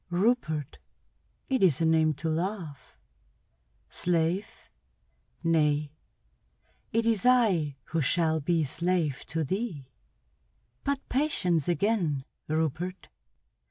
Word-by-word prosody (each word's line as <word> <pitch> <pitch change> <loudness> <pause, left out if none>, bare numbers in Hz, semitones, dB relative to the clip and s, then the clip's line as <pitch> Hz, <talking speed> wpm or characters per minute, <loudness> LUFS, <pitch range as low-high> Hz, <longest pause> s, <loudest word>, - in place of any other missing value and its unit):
"Rupert. 175 - 0 0.7
It 260 -2 +1
is 175 -9 +4
a 165 - +2
name 160 -1 +3
to 160 - -4
love. 160 -5 -4 0.9
Slave? 175 +3 -1 0.8
Nay, 150 -3 +2 1.0
it 230 +1 +1
is 225 -4 +1
I 195 - +3
who 165 0 -2
shall 160 +2 +2
be 165 +2 +1
slave 165 -1 -1
to 165 -1 -1
thee. 160 - -3 0.9
But 280 -1 -2
patience 180 - +1
again, 175 -7 +1 0.2
Rupert. 160 +4 -2
165 Hz, 95 wpm, -28 LUFS, 155-195 Hz, 1.0 s, is